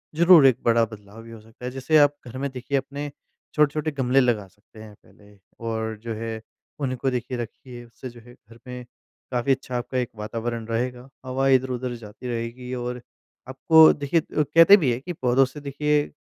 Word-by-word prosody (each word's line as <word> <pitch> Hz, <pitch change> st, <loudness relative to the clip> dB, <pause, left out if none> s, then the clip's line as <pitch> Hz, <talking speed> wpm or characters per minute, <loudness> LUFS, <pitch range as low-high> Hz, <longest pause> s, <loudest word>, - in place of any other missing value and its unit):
ज़रूर 170 Hz, -2 st, +7 dB
एक 130 Hz, -3 st, +3 dB
बड़ा 115 Hz, 0 st, +4 dB
बदलाव 105 Hz, 0 st, -13 dB
भी 115 Hz, -, -13 dB
हो 115 Hz, -, -10 dB
सकता 115 Hz, +3 st, -13 dB
है। 125 Hz, -, -3 dB
जैसे 135 Hz, +4 st, +1 dB
आप 145 Hz, -1 st, +5 dB
घर 120 Hz, -, -8 dB
में 140 Hz, +1 st, -2 dB
देखिए 130 Hz, +2 st, -2 dB
अपने 140 Hz, +2 st, -5 dB, 0.4 s
छोटे-छोटे 150 Hz, +1 st, +1 dB
गमले 135 Hz, -2 st, +1 dB
लगा 120 Hz, -6 st, +1 dB
सकते 105 Hz, +3 st, -20 dB
हैं 110 Hz, -1 st, -12 dB
पहले 105 Hz, 0 st, -21 dB, 0.3 s
और 110 Hz, -1 st, -3 dB
जो 115 Hz, -1 st, -4 dB
है 110 Hz, 0 st, -5 dB, 0.4 s
उनको 135 Hz, -1 st, -1 dB
देखिए 125 Hz, 0 st, -3 dB
रखिए 120 Hz, +1 st, -8 dB
उससे 120 Hz, +2 st, -10 dB
जो 120 Hz, 0 st, -14 dB
है 120 Hz, +2 st, -16 dB
घर 115 Hz, -1 st, -20 dB
में 125 Hz, 0 st, -8 dB, 0.5 s
काफ़ी 125 Hz, +2 st, 0 dB
अच्छा 130 Hz, -1 st, -2 dB
आपका 125 Hz, +1 st, -4 dB
एक 125 Hz, -2 st, -1 dB
वातावरण 115 Hz, +2 st, -4 dB
रहेगा। 125 Hz, +2 st, -3 dB, 0.2 s
हवा 130 Hz, +1 st, -1 dB
इधर-उधर 130 Hz, -1 st, +1 dB
जाती 115 Hz, +2 st, -10 dB
रहेगी 120 Hz, +1 st, -5 dB
और 125 Hz, 0 st, -5 dB, 0.5 s
आपको 155 Hz, +5 st, +6 dB
देखिए 145 Hz, +3 st, 0 dB, 0.2 s
उ -, -, +4 dB
कहते 165 Hz, +7 st, +7 dB
भी 145 Hz, -10 st, +1 dB
हैं 120 Hz, -, -2 dB
कि 175 Hz, +5 st, -6 dB
पौधों 130 Hz, -3 st, +2 dB
से 130 Hz, +3 st, -10 dB
देखिए 145 Hz, +1 st, 0 dB
125 Hz, 190 wpm, -24 LUFS, 115-135 Hz, 0.5 s, ज़रूर